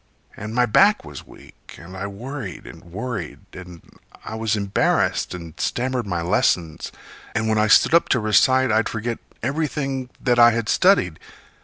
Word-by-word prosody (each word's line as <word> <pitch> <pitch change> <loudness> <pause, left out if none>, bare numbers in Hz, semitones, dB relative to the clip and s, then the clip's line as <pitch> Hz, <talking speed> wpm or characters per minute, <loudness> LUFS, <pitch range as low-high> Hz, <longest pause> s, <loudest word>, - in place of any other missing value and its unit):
And 105 +2 -7
my 125 0 +3
back 200 - +3
was 75 -2 -10
weak, - - -16
and 90 +3 -12
I 95 +1 -4
worried 110 - -7
and - - -13
worried, 100 0 -6
And 90 -2 -11 0.4
I - - -6
was 110 0 -1
embarrassed 100 -2 0
and 85 -3 -9
stammered 125 -2 -2
my 85 -3 -2
lessons, 85 -1 0 0.4
And 110 0 0
when 110 -1 +1
I 105 - +3
stood 110 - +5
up 170 - +4
to 130 - +2
recite 130 +4 +3
I'd 110 +1 +1
forget 115 +1 -4 0.2
Everything 135 -1 -2
that 120 -1 +1
I 120 0 +8
had 115 -1 -2
studied. 180 - +3
110 Hz, 165 wpm, -22 LUFS, 95-130 Hz, 0.4 s, I